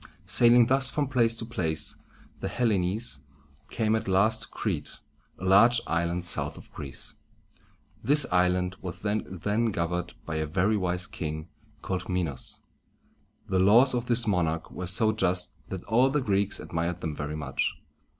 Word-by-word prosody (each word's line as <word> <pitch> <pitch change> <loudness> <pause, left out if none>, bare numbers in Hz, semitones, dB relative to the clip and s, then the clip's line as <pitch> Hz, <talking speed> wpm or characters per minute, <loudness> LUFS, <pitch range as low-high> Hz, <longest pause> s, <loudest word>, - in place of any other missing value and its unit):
Sailing 120 0 +5
thus 130 +1 +3
from 145 0 -1
place 120 -3 +2
to 115 - -5
place, 90 -9 -2 0.4
the - - -3
Hellenes 105 - -1 0.5
came 110 -2 +1
at 110 - -3
last 100 +4 +3
to - - -4
Crete, - - -4 0.4
a 95 - -7
large 115 +6 +6
island 85 +1 -1
south 90 - -2
of - - -14
Greece. 70 -4 -8 0.9
This 145 +4 +4
island 90 0 +2
was 90 -2 -6
then 105 +1 -1
governed 90 -4 -2
by 80 -1 -3
a 80 0 -1
very 95 +7 +1
wise 90 -2 0
king 80 -1 -5 0.3
called 95 -1 -3
Mi´nos. 85 -8 -3 0.9
The 95 - +1
laws 115 +8 +6
of 120 -1 -2
this 120 0 +3
monarch 85 -6 0
were 90 - -5
so 110 +4 +3
just 90 -3 0 0.2
that 95 -2 -5
all 125 +4 +3
the 150 +2 +1
Greeks 100 -5 0
admired 85 +1 -3
them 80 -3 -3
very 75 +1 -4
much. 70 -3 -2
95 Hz, 155 wpm, -27 LUFS, 90-115 Hz, 0.9 s, large